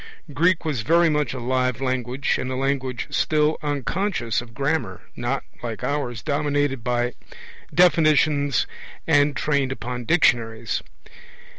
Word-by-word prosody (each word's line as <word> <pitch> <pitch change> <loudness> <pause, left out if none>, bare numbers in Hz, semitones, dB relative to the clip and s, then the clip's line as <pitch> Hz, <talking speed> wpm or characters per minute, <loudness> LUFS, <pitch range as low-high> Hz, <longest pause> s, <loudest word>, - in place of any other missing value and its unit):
Greek 170 +3 +2
was 145 -7 -1
very 165 +8 +4
much 150 -5 0
a - - -4
live 125 0 0
language, 130 0 -1
and 130 - -3
a - - -2
language 130 -2 -1
still 150 +3 +1
unconscious 145 - -1
of 115 -2 -13
grammar, 145 +4 -1
not, 120 +3 -2 0.2
like 115 -2 -5
ours, 125 -7 -2
dominated 145 -3 0
by 120 0 0 0.6
definitions 155 -5 +3 0.4
and 145 -2 +3
trained 140 0 0
upon 125 -2 -5
dictionaries. 115 -7 +2
135 Hz, 125 wpm, -23 LUFS, 120-150 Hz, 0.6 s, very